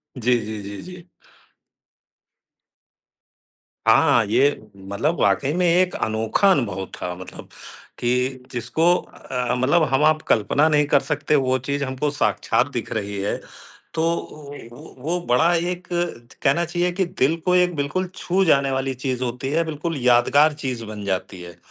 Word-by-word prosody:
जी, 125 Hz, 0 st, +1 dB
जी, 110 Hz, -1 st, -5 dB
जी, 100 Hz, 0 st, -7 dB
जी। 180 Hz, 0 st, -11 dB, 2.8 s
हाँ, 120 Hz, 0 st, +5 dB
ये 125 Hz, +7 st, +3 dB, 0.4 s
मतलब 145 Hz, -, -1 dB
वाक़ई 100 Hz, +8 st, +2 dB
में 180 Hz, 0 st, +1 dB
एक 180 Hz, +2 st, +3 dB
अनोखा 110 Hz, -, +1 dB
अनुभव 105 Hz, -, 0 dB
था। 90 Hz, -, -5 dB
मतलब 95 Hz, +1 st, -11 dB, 0.5 s
कि 125 Hz, +1 st, -1 dB
जिसको 160 Hz, +8 st, +1 dB
अ, 125 Hz, -7 st, -4 dB
मतलब 140 Hz, +7 st, +3 dB
हम-आप 155 Hz, +3 st, +3 dB
कल्पना 140 Hz, +8 st, +3 dB
नहीं 150 Hz, -1 st, +3 dB
कर 145 Hz, -, +4 dB
सकते, 150 Hz, +1 st, -1 dB
वो 130 Hz, -2 st, +2 dB
चीज़ 140 Hz, +3 st, -2 dB
हमको 130 Hz, +2 st, -2 dB
साक्षात 145 Hz, -, +1 dB
दिख -, -, -5 dB
रही 100 Hz, -2 st, -3 dB
है। 100 Hz, -, -1 dB, 0.6 s
तो 160 Hz, -, -1 dB
ओ, 150 Hz, -3 st, -7 dB, 0.2 s
वो 120 Hz, -, -13 dB
वो 165 Hz, +7 st, -2 dB
बड़ा 160 Hz, +8 st, +4 dB
एक 180 Hz, +1 st, -3 dB, 0.4 s
त -, -, -13 dB
कहना 170 Hz, +5 st, +2 dB
चाहिए 175 Hz, +1 st, -1 dB
कि 190 Hz, +2 st, 0 dB
दिल 165 Hz, -3 st, +1 dB
को 180 Hz, -, +3 dB
एक 180 Hz, -1 st, +3 dB
बिल्कुल 155 Hz, +6 st, -2 dB
छू 190 Hz, +2 st, 0 dB
जाने 140 Hz, -3 st, +3 dB
वाली 135 Hz, 0 st, -1 dB
चीज़ 130 Hz, 0 st, -3 dB
होती 125 Hz, +2 st, -3 dB
है, 165 Hz, +2 st, +2 dB
बिल्कुल 160 Hz, 0 st, -4 dB
यादगार 125 Hz, +5 st, +5 dB
चीज़ 125 Hz, -4 st, -3 dB
बन 105 Hz, -1 st, -7 dB
जाती 95 Hz, -1 st, -3 dB
है 85 Hz, -1 st, -11 dB
140 Hz, 155 wpm, -22 LUFS, 120-165 Hz, 2.8 s, हाँ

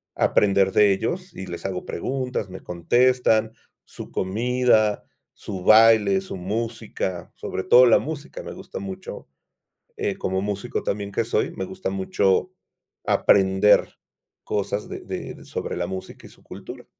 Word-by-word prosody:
aprender 100 Hz, -1 st, +3 dB
de 105 Hz, -1 st, +5 dB
ellos 180 Hz, -, -3 dB
y 95 Hz, -, -6 dB
les 85 Hz, +1 st, -8 dB
hago 90 Hz, -2 st, -3 dB
preguntas, 125 Hz, -1 st, -3 dB
me 95 Hz, -, -9 dB
contestan. 115 Hz, +4 st, +2 dB, 0.3 s
Su -, -, -10 dB
comida, 110 Hz, +1 st, +1 dB, 0.3 s
su 95 Hz, -3 st, -7 dB
baile, 110 Hz, -2 st, +6 dB
su 95 Hz, -, -7 dB
música, 105 Hz, -2 st, -4 dB
sobre 95 Hz, -, -5 dB
todo 125 Hz, +5 st, +7 dB
la 120 Hz, -, +6 dB
música 150 Hz, -1 st, -6 dB
me -, -, -7 dB
gusta -, -, -8 dB
mucho. 95 Hz, -1 st, -8 dB, 0.7 s
Eh, -, -, -1 dB
como 95 Hz, 0 st, -2 dB
músico 100 Hz, 0 st, -3 dB
también 100 Hz, 0 st, -3 dB
que 115 Hz, -, 0 dB
soy, 120 Hz, -, 0 dB
me 175 Hz, -, -5 dB
gusta 190 Hz, +1 st, -5 dB
mucho 185 Hz, -, +1 dB, 0.5 s
aprender 95 Hz, +1 st, +4 dB, 0.6 s
cosas 100 Hz, 0 st, -2 dB
de -, -, -6 dB
de, -, -, -7 dB
sobre -, -, -4 dB
la 90 Hz, 0 st, -2 dB
música 95 Hz, 0 st, -8 dB
y -, -, -16 dB
su -, -, -20 dB
cultura. -, -, -10 dB
105 Hz, 145 wpm, -23 LUFS, 95-120 Hz, 0.7 s, todo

